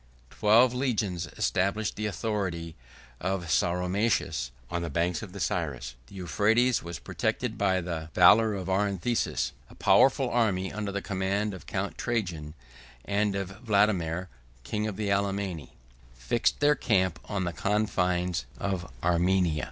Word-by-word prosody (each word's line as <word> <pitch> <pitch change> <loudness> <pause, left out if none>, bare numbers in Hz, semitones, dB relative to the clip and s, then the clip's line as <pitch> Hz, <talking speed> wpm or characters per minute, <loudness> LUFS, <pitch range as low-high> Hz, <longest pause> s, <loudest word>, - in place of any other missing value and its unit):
13511 - - -19
Twelve 115 +4 +5
legions 105 -10 -1
established 100 +3 0
the 105 0 -2
authority 95 -6 -3 0.4
of 95 -1 -2
Sauromaces 90 - +1 0.2
on 85 0 -1
the 85 - -3
banks 85 +4 0
of 105 -4 -8
the 100 - -8
Cyrus. 70 -8 -2
The 100 - -14
Euphrates 105 - +2
was 85 0 -6
protected - - -2
by 95 -2 +1
the 85 -2 -5
valor 110 -1 +6
of 95 -2 -5
Arintheus. 100 +3 0 0.2
A - - -15
powerful 130 +7 +4
army, 105 -6 +1
under 105 -1 -3
the 100 0 -3
command 100 +1 -1
of 95 - -10
Count - - -3
Trajan, 85 -10 -2 0.5
and 100 0 +1
of 95 +2 -5
Vadomair, 100 -6 +2 0.4
king 105 - -2
of 105 - -4
the 105 -2 -2
Alemanni, 100 -4 -1 0.4
fixed 60 - 0
their 145 0 +5
camp 95 - +1
on 100 -3 -1
the 85 -1 -2
confines 90 - 0
of 95 -6 -3
Armenia. 90 -1 +2
95 Hz, 145 wpm, -28 LUFS, 85-105 Hz, 0.5 s, valor